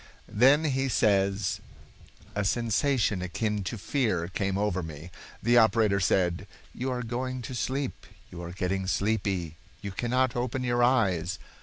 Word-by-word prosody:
Then 135 +8 +5
he 135 -3 0
says: 100 -3 +2 0.7
"A 105 - -1
sensation 115 -1 +1
akin 105 +3 -2
to 115 - -3
fear 105 -7 0
came 95 0 -1
over 100 -3 0
me. 80 +1 -8 0.3
The 120 +1 +5
operator 110 -2 +3
said: 90 -2 +1 0.3
'You 130 +2 -3
are 125 -1 -2
going 125 +2 -3
to 120 - -6
sleep, 130 +2 -3 0.2
you 85 - -8
are 85 0 -6
getting 95 +1 -2
sleepy. 95 -6 -1 0.3
You 100 - -4
cannot 120 +5 0
open 125 +1 -2
your 120 -1 +1
eyes. 95 -9 +2
105 Hz, 145 wpm, -28 LUFS, 95-125 Hz, 0.7 s, Then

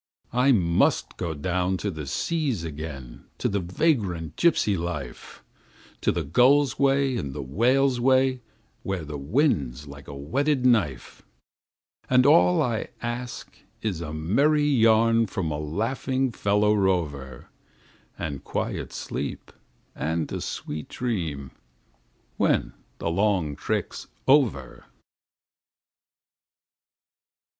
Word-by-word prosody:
I 125 +3 +4
must 85 -8 +2
go 80 -2 -3
down 90 +4 -1
to 100 +2 -3
the 75 -4 -7
seas 140 - -1
again, 75 -5 -7
to - - 0
the 100 - 0
vagrant 90 - 0
gypsy 145 -11 +3
life, 85 -7 -6 0.6
To - - +2
the - - -2
gull's 135 - +3
way 135 -1 +2
and 70 - -4
the 70 - -4
whale's 125 - +2
way, 130 0 +3 0.4
where 95 -4 -3
the 75 -1 -6
wind's 70 - 0
like 70 0 -12
a 70 - -8
whetted 130 - 0
knife; 95 - +1 0.9
And 125 0 +5
all 90 -10 +5
I 115 -3 -2 0.2
ask 120 +1 -5 0.3
is 95 -7 -2
a 75 -2 -5
merry 135 - +2
yarn 115 -4 +4
from 90 -4 -3
a 75 - -3
laughing 125 - -1
fellow 105 0 +2
rover, 80 - -1 0.7
And 70 -3 -5
quiet - - -3
sleep - - -5 0.4
and 80 0 -2
a - - -3
sweet 75 0 -5
dream 80 - -3 0.9
when - - +1 0.2
the 85 - -2
long 90 -5 +1
trick's - - -3 0.2
over. 120 - +2
95 Hz, 115 wpm, -25 LUFS, 75-125 Hz, 0.9 s, And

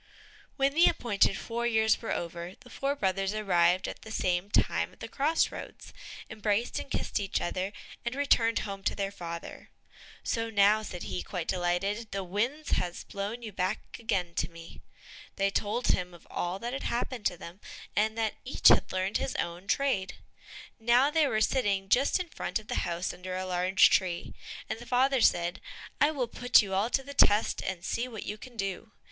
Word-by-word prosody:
When 275 0 +2
the 335 +3 +6
appointed 205 -4 +2
four 235 +1 -2
years 220 -2 +3
were 230 - -4
over, 170 +1 -4
the 250 -3 -15
four 275 +3 -1
brothers 195 -3 0
arrived 180 -3 +3
at - - -7
the 220 - -10
same 185 -2 0
time - - +1
at - - -21
the - - -6
cross 305 +4 +1
roads, - - -9 0.3
embraced 215 +2 -1
and - - -8
kissed - - -1
each 195 -2 -1
other, 185 +3 -2 0.3
and 235 +1 -3
returned 235 -5 +3
home 195 -1 -5
to - - +1
their 200 -1 -2
father. 170 -3 -7 0.5
"So 230 0 -1
now," 210 0 +4
said 180 -4 -6
he, 95 -4 -3
quite 170 - -5
delighted, 190 +5 -1
"the 195 0 -3
wind 235 - -2
has 175 -1 -1
blown 205 +4 -5
you 220 - -6
back 190 +2 -3
again 180 -6 -1
to - - 0
me." 165 0 -12 0.5
They 195 0 +1
told 220 +5 0
him 180 -1 0
of 170 - -17
all 175 +2 -2
that 235 +4 -5
had 270 - -3
happened 240 -1 -1
to 180 - -4
them, 175 +4 -10 0.3
and 220 +1 +1
that 220 -2 0
each 260 - +5
had - - +4
learnt 185 +2 0
his - - -3
own 175 +3 -3
trade. 200 -5 0 0.6
Now 240 +5 +4
they 315 -2 +3
were 215 -4 0
sitting 200 -6 +1
just 270 - +3
in 365 - -3
front - - -3
of 215 -1 -10
the - - -1
house 170 +1 -2
under 185 +1 -5
a 185 - -3
large 185 +1 +4
tree, 180 -3 0 0.3
and - - -4
the 240 - -11
father 260 +1 +3
said, 175 -3 +2 0.4
"I 290 - +6
will 270 -6 -1
put 245 0 +4
you 195 -1 -5
all 200 +4 +1
to 270 - +1
the 280 +1 -8
test, 210 -5 +4
and 185 -1 -4
see 240 +2 -1
what 225 -4 -7
you 210 +1 -5
can 250 -1 -12
do." 195 +2 -4
205 Hz, 195 wpm, -29 LUFS, 185-235 Hz, 0.6 s, the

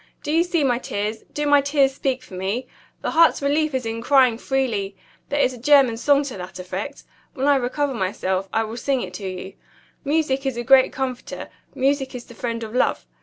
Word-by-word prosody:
Do 295 - -2
you 330 +2 +4
see 345 -3 0
my 245 -3 +2
tears? 215 -2 -4
Do 295 - -2
my 290 -1 +5
tears 280 -1 +2
speak 265 -1 -2
for 225 - -15
me? 195 +7 -2 0.4
The - - -1
heart's 335 0 +5
relief 290 +1 +1
is 255 -2 -2
in 225 0 -3
crying 255 -3 +4
freely. 230 -8 -1 0.3
There 290 - 0
is 260 -2 +3
a 245 - -10
German 270 -2 +5
song 280 +4 +3
to 270 -7 -6
that 180 0 -8
effect. 185 +9 -6 0.3
When 270 -1 -1
I 285 0 +5
recover 270 +3 -1
myself, 190 -2 -2
I 225 - +1
will 220 +1 -6
sing 265 0 0
it 180 -4 -6
to 190 +1 -5
you. 185 +1 -7 0.5
Music 285 -2 0
is 260 -3 -2
a 240 - -2
great 265 +1 +6
comforter; 260 -2 -5 0.3
music 270 0 0
is 240 - -7
the - - -13
friend 230 0 -4
of 220 0 -7
love. 250 - +1
255 Hz, 215 wpm, -22 LUFS, 225-280 Hz, 0.5 s, great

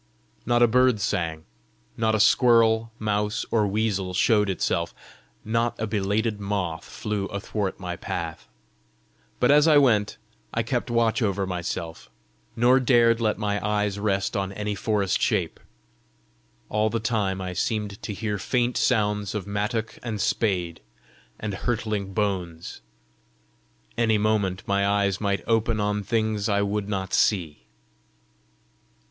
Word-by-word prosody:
Not 120 0 +4
a - - +7
bird 125 -1 +3
sang, 80 -5 -2 0.5
not 110 0 +1
a - - 0
squirrel, 115 0 +4
mouse, 105 -1 -1
or 110 -3 +2
weasel 100 -3 -1
showed 105 0 +3
itself, 85 -2 -1 0.5
not 115 +2 0
a 110 - -1
belated 105 +1 -1
moth 100 -5 -2
flew 105 -2 -3
athwart 100 -1 -3
my 90 -2 -4
path. - - -5 0.9
But 125 - +4
as 150 +2 +6
I 155 -2 +6
went 115 -7 +3 0.4
I 115 - +1
kept 120 +2 -2
watch 115 +1 +1
over 100 -3 0
myself, 85 -2 -5 0.5
nor 125 +3 +4
dared 120 -2 +4
let 110 -2 +1
my 105 -1 -2
eyes 105 -1 0
rest 100 0 0
on 95 -1 -1
any 105 +1 -3
forest 100 -1 0
shape. - - 0 1.1
All 105 +1 +1
the 115 - -1
time 105 -4 -1
I 90 -1 -4
seemed 105 +2 -2
to - - -5
hear 105 0 -3
faint 120 +6 0
sounds 105 -3 +1
of 105 - -3
mattock 105 +3 -3
and 110 -3 -4
spade 90 -6 -1 0.6
and 105 -2 -4
hurtling 105 -2 -2
bones: 90 - -3 1.2
any 110 -2 +3
moment 105 -3 0
my 100 0 +1
eyes 100 -1 +1
might 100 -1 0
open 115 0 +1
on 105 0 0
things 110 0 -1
I 100 0 +2
would 100 0 -2
not 95 -2 -3
see! 85 -8 +1
105 Hz, 140 wpm, -25 LUFS, 100-115 Hz, 1.2 s, a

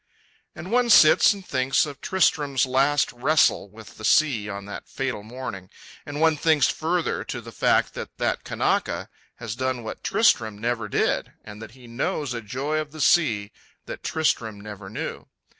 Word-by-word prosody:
And 185 - -8
one 245 0 +2
sits 155 -8 +7
and 200 -2 -6
thinks 130 0 +1
of 145 -2 -9
Tristram's 145 -7 +1
last 135 +3 +2
wrestle 135 -3 +2
with 110 +1 -14
the - - -10
sea 120 -6 +2
on 100 -1 -6
that 100 - -9
fatal 135 -5 -3
morning; 105 -5 -8 0.4
and 145 0 -5
one 160 -1 +3
thinks 155 -3 +3
further, 170 +1 -1
to - - -5
the - - -11
fact - - +1
that - - -8
that - - -1
Kanaka - - -1 0.3
has 115 -2 -6
done 130 -1 -2
what 110 - -7
Tristram 110 -2 +2
never 115 -1 -2
did, - - 0
and 105 0 -11
that 110 -1 -10
he 125 - -15
knows 125 +3 -3
a 120 - -4
joy 135 +8 -2
of 155 -1 -5
the 155 - -10
sea 110 -10 +2 0.3
that - - -8
Tristram 115 -9 -1
never 105 -2 -9
knew. 110 - -6
130 Hz, 175 wpm, -24 LUFS, 110-155 Hz, 0.4 s, sits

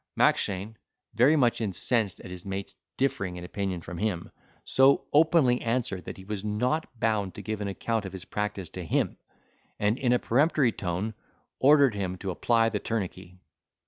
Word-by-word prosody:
Mackshane, 100 +3 +1 0.4
very 125 +8 +5
much 120 -5 +2
incensed 105 +1 0
at 90 - -10
his 90 -1 -8
mate's 95 0 -5 0.2
differing 100 -9 -1
in 90 - -7
opinion 95 -1 -3
from 85 +1 -7
him, 95 -5 -2 0.3
so 135 +1 +4
openly, 150 -5 +4
answered, 115 -5 -1
that - - -7
he 95 - -11
was 105 -1 -4
not 125 +9 0
bound 105 -4 0
to 105 - -8
give 110 +1 -4
an 100 - -2
account 110 +3 -2
of 95 - -7
his 95 -2 -8
practice 105 -4 -3
to - - -6
him; - - -1 0.6
and 105 +4 +1
in 125 -2 +1
a 125 - +5
peremptory 135 +1 +2
tone, 95 +3 -3 0.5
ordered 140 -3 +6
him 95 -2 -3
to 95 +1 -4
apply 115 +5 +2
the 105 -2 -2
tourniquet. 95 -5 -4
105 Hz, 175 wpm, -27 LUFS, 95-120 Hz, 0.6 s, ordered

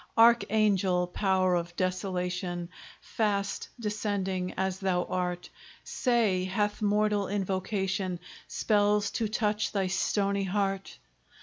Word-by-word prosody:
Archangel! 210 -5 +4
power 185 0 +1
of 175 0 -2
desolation! 180 -1 -2 0.3
Fast 200 -2 -1
descending 200 -4 -2
as 190 0 -1
thou 185 -2 +1
art, 180 -1 -2 0.4
Say, 220 -8 +1
hath 205 +2 -1
mortal 210 -1 +2
invocation 190 -1 -1 0.3
Spells 205 -1 +2
to 225 - -1
touch 210 -1 0
thy 195 -2 0
stony 195 +1 0
heart? 195 0 -2
195 Hz, 100 wpm, -29 LUFS, 185-210 Hz, 0.4 s, Archangel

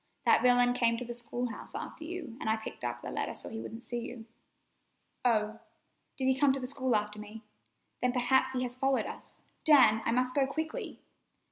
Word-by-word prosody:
That - - +6
villain 245 0 +5
came 235 -2 +2
to 250 - -5
the 240 - -5
school 240 +1 -3
house - - -9
after 320 - -6
you, 320 -7 -6
an' - - -3
I 220 - +3
picked 220 - -8
up - - -3
the - - -5
letter - - -2
so - - -7
he 225 - -6
wouldn't 225 +1 -7
see 240 -1 -4
it." 230 -3 -9 1.0
"Oh, 220 -2 +1 0.6
did 265 - 0
he 265 0 +3
come 285 -1 +5
to 275 - -2
the 255 - -4
school 260 -2 0
after 210 0 -1
me? 210 +2 -9 0.6
Then 250 - +2
perhaps 260 +1 +2
he 255 -1 0
has 245 0 -4
followed 270 +1 +1
us. - - -9 0.2
Dan, 260 -8 +7
I - - +1
must 255 +1 +1
go 275 -1 +2
quickly!" 315 +3 -4
245 Hz, 210 wpm, -31 LUFS, 225-265 Hz, 1.0 s, Dan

